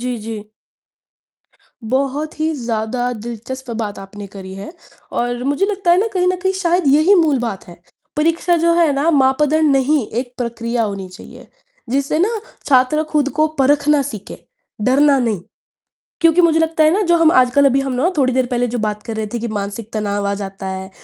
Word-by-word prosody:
जी, 250 Hz, 0 st, -3 dB
जी। 215 Hz, -1 st, -7 dB, 1.4 s
बहुत 280 Hz, +4 st, -2 dB
ही 320 Hz, +1 st, +1 dB
ज़्यादा 240 Hz, 0 st, -2 dB
दिलचस्प 240 Hz, +3 st, -7 dB
बात 205 Hz, -1 st, -5 dB
आपने 200 Hz, +1 st, -9 dB
करी 190 Hz, -1 st, -8 dB
है 195 Hz, +10 st, -8 dB, 0.5 s
और 245 Hz, 0 st, -2 dB
मुझे 285 Hz, +8 st, +1 dB
लगता 390 Hz, -4 st, 0 dB
है 350 Hz, -, +5 dB
ना 445 Hz, -, +1 dB
कहीं 360 Hz, -1 st, +1 dB
न 370 Hz, -, +1 dB
कहीं 380 Hz, 0 st, +1 dB
शायद 355 Hz, -3 st, 0 dB
यही 315 Hz, +7 st, +5 dB
मूल 315 Hz, -7 st, +3 dB
बात 225 Hz, -5 st, -4 dB
है, 170 Hz, 0 st, -13 dB, 0.4 s
परीक्षा 330 Hz, +3 st, +2 dB
जो 335 Hz, -, +4 dB
है 320 Hz, -4 st, +4 dB
ना 285 Hz, +4 st, +1 dB
मापदंड 295 Hz, +2 st, +3 dB
नहीं, 270 Hz, -2 st, +1 dB
एक 245 Hz, +2 st, -4 dB
प्रक्रिया 235 Hz, 0 st, -2 dB
होनी 195 Hz, -3 st, -4 dB
चाहिए 185 Hz, +3 st, -13 dB, 0.4 s
जिससे 280 Hz, +3 st, 0 dB
ना 430 Hz, +4 st, 0 dB, 0.3 s
छात्र 265 Hz, +3 st, +3 dB
खुद 295 Hz, -2 st, +2 dB
को 310 Hz, -, +5 dB
परखना 290 Hz, +1 st, +3 dB
सीखे, 215 Hz, -6 st, -8 dB, 0.4 s
डरना 275 Hz, +3 st, +4 dB
नहीं। 225 Hz, -7 st, -1 dB, 0.8 s
क्योंकि 330 Hz, +1 st, +5 dB
मुझे 325 Hz, -2 st, +3 dB
लगता 320 Hz, -1 st, +2 dB
है 310 Hz, -, +5 dB
ना 415 Hz, -, +1 dB
जो 345 Hz, -, +4 dB
हम 330 Hz, -1 st, +5 dB
आजकल 255 Hz, +2 st, +4 dB
अभी 270 Hz, 0 st, +4 dB
हम 270 Hz, -1 st, -3 dB
ना 280 Hz, +9 st, +1 dB
थोड़ी 260 Hz, -3 st, +2 dB
देर 255 Hz, 0 st, +2 dB
पहले 245 Hz, 0 st, +1 dB
जो 245 Hz, +1 st, -3 dB
बात 210 Hz, -1 st, -2 dB
कर 225 Hz, -2 st, -5 dB
रहे 220 Hz, -, -2 dB
थे 240 Hz, -, -2 dB
कि 235 Hz, -, -3 dB
मानसिक 205 Hz, +3 st, -6 dB
तनाव 205 Hz, -1 st, -1 dB
आ 200 Hz, -, 0 dB
जाता 195 Hz, 0 st, -6 dB
है 190 Hz, 0 st, -5 dB
260 Hz, 190 wpm, -18 LUFS, 225-310 Hz, 1.4 s, है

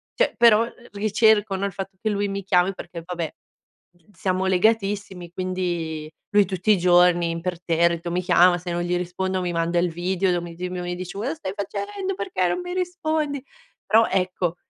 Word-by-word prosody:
cioè -, -, +2 dB
però 230 Hz, -1 st, +6 dB
l 240 Hz, 0 st, -14 dB
ricerco, 210 Hz, 0 st, +3 dB
no, 195 Hz, +1 st, -1 dB
il 200 Hz, -, -2 dB
fatto 195 Hz, -1 st, -7 dB
che 215 Hz, -, 0 dB
lui 205 Hz, 0 st, 0 dB
mi 195 Hz, 0 st, -4 dB
chiami, 180 Hz, 0 st, +2 dB
perché 175 Hz, -1 st, -8 dB
vabbè, 175 Hz, -3 st, -4 dB, 0.6 s
mhmm, 175 Hz, +4 st, -27 dB
siamo 185 Hz, 0 st, -1 dB
legatissimi, 195 Hz, -2 st, 0 dB
quindi 175 Hz, -4 st, -3 dB, 0.2 s
lui 205 Hz, -1 st, +6 dB
tutti 185 Hz, +2 st, 0 dB
i 205 Hz, -, +5 dB
giorni 175 Hz, -1 st, +4 dB
imperterrito 170 Hz, 0 st, 0 dB
mi 180 Hz, +1 st, 0 dB
chiama, 180 Hz, 0 st, +5 dB
se 175 Hz, 0 st, -5 dB
non 175 Hz, -, -1 dB
gli 175 Hz, 0 st, 0 dB
rispondo 185 Hz, +1 st, -2 dB
mi 180 Hz, -1 st, -2 dB
manda 165 Hz, +1 st, 0 dB
il 175 Hz, +1 st, +1 dB
video 180 Hz, +2 st, 0 dB
do 175 Hz, -1 st, 0 dB
mi 170 Hz, -1 st, -8 dB
di 180 Hz, +2 st, -4 dB
dove 180 Hz, 0 st, -5 dB
mi 175 Hz, 0 st, -3 dB
dice: 180 Hz, +1 st, -7 dB
"Cosa 245 Hz, +9 st, -2 dB
stai 190 Hz, -, -5 dB
facendo, 390 Hz, -, -4 dB
perché 360 Hz, -, -1 dB
non 265 Hz, -, -1 dB
mi 355 Hz, 0 st, -5 dB
rispondi?" 315 Hz, -6 st, -2 dB, 0.4 s
Però 225 Hz, +1 st, +4 dB
ecco, 180 Hz, -2 st, -1 dB
185 Hz, 190 wpm, -23 LUFS, 175-205 Hz, 0.6 s, però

